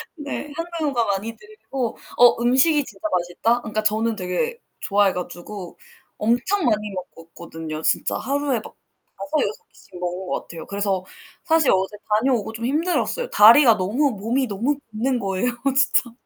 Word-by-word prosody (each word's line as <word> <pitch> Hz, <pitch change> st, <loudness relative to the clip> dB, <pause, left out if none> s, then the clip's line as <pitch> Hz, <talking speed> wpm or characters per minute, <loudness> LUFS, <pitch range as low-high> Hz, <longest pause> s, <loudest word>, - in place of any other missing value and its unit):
네. 295 Hz, -1 st, -6 dB
한국어가 315 Hz, -7 st, -1 dB
많이 225 Hz, +4 st, -6 dB
들리고 275 Hz, -, -5 dB, 0.2 s
어, 240 Hz, -1 st, +6 dB
음식이 265 Hz, +5 st, +4 dB
진짜 320 Hz, -, -6 dB
맛있다. 180 Hz, +7 st, +1 dB
그니까 215 Hz, -1 st, -3 dB
저는 220 Hz, +2 st, +1 dB
되게 205 Hz, -, -2 dB, 0.2 s
좋아해 200 Hz, -1 st, +2 dB
가지고 180 Hz, +1 st, -7 dB, 0.4 s
엄청 245 Hz, -, +1 dB
많이 210 Hz, -3 st, 0 dB, 0.2 s
먹었거든요. 160 Hz, -1 st, -8 dB
진짜 -, -, +1 dB
하루에 280 Hz, -2 st, -1 dB
막 -, -, -12 dB, 0.4 s
5-6 310 Hz, +10 st, -2 dB
끼씩 180 Hz, -, -15 dB
먹은 180 Hz, +1 st, -4 dB
것 -, -, -2 dB
같아요. 165 Hz, -1 st, -10 dB
그래서 200 Hz, -2 st, -1 dB, 0.4 s
사실 320 Hz, -3 st, +4 dB
어제 190 Hz, +2 st, 0 dB
다녀오고 220 Hz, 0 st, +1 dB
좀 225 Hz, +1 st, -5 dB
힘들었어요. 350 Hz, -, 0 dB
다리가 230 Hz, +2 st, +7 dB
너무 235 Hz, +10 st, +1 dB
몸이 230 Hz, +5 st, -1 dB
너무 235 Hz, +8 st, -1 dB
붓는 245 Hz, +4 st, 0 dB
거예요 195 Hz, +4 st, -1 dB, 0.2 s
진짜. 270 Hz, -3 st, +3 dB
230 Hz, 325 characters per minute, -22 LUFS, 195-285 Hz, 0.4 s, 다리가